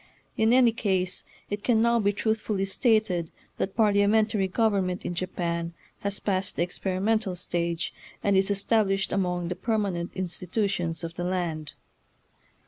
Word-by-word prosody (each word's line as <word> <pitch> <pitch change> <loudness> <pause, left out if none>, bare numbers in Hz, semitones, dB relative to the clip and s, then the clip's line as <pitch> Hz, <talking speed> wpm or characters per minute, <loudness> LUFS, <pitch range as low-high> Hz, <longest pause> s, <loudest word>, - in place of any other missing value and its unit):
In 220 +1 +3
any 245 -1 +6
case 190 -5 0 0.3
it 205 0 -3
can 235 -3 +3
now 235 +1 +4
be 205 -2 +3
truthfully 210 -1 -1
stated 195 -6 +2 0.3
that 190 - -2
parliamen 210 0 +4
tary 205 -3 0
government 195 -3 0
in - - -2
Japan 170 -2 -2 0.2
has 200 0 -3
passed 190 -2 -1
the - - +1
experimental 190 +3 -1
stage, 170 -1 -2 0.3
and 200 -1 +3
is 190 +1 +3
established 200 -1 +1
among 180 -3 0
the 180 - -2
permanent 195 -4 -1
institutions 180 -2 -1
of 165 0 -4
the 175 - -4
land. 170 -4 -2
195 Hz, 140 wpm, -27 LUFS, 180-215 Hz, 0.3 s, any